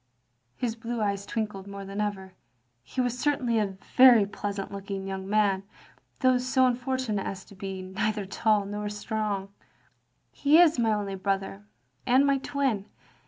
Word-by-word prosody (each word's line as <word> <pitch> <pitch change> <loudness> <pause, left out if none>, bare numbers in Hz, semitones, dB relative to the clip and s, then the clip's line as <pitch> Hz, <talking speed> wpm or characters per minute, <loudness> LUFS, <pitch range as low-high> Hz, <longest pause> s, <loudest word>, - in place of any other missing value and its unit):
His 235 -3 -2
blue 235 +1 -4
eyes 200 -1 -1
twinkled 210 -4 -3
more 200 0 -7
than 195 +2 -4
ever. 190 -3 -3 0.5
He 195 - -7
was 250 0 0
certainly 250 -5 +1
a 200 -2 -1 0.2
very 250 -5 +8
pleasant 200 0 -5
looking 195 -1 -5
yoting 190 0 -4
man, 200 -2 +2 0.6
though 255 -1 +4
so 260 +1 +2
unfortunate 250 -4 -1
as 190 -1 -6
to 200 - -15
be 190 0 -6
neither 210 +2 -2
tall 205 +1 +1
nor 205 +1 -4
strong. 210 -2 -3 0.4
" - - -45 0.3
He 295 +2 +4
is 325 -6 +5
my 225 -2 +3
only 205 -2 -1
brother, 195 - -3 0.4
and 260 +3 +5
my 275 -1 +3
twin. 265 -8 -1
210 Hz, 160 wpm, -27 LUFS, 195-245 Hz, 0.6 s, very